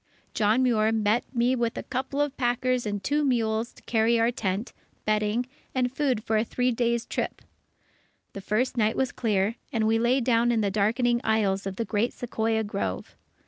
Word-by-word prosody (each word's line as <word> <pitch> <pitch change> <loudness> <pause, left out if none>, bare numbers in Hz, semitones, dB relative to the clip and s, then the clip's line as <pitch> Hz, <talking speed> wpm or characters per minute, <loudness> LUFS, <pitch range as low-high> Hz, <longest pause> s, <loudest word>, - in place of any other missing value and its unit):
John 220 +4 +2
Muir 220 -3 +3
met 220 +1 +1
me 245 +1 +2
with 235 -2 -1
a - - -4
couple 270 +2 -2
of 290 -2 -1
packers 245 -1 0
and 205 -1 -3
two 295 +7 +1
mules 230 -3 0
to - - -19
carry 230 0 +2
our 230 +1 +3
tent, 205 0 -3 0.3
bedding, 215 +3 +1 0.3
and 250 0 0
food 260 -7 0
for 220 -1 +1
a 215 - +2
three 250 +2 0
days' 235 0 0
trip. - - -4 0.9
The 200 - -7
first 240 +6 -1
night 220 -1 +2
was 265 -1 +1
clear, 210 -1 0
and 225 -4 0
we 225 +1 +3
lay 240 +3 +3
down 240 -1 +2
in 230 -2 +1
the 200 -2 0
darkening 235 +4 +1
aisles 200 -3 +1
of 195 - -4
the 230 - -2
great 220 +2 0
Sequoia 225 -2 -1
grove. 95 - -4
230 Hz, 185 wpm, -26 LUFS, 215-245 Hz, 0.9 s, Muir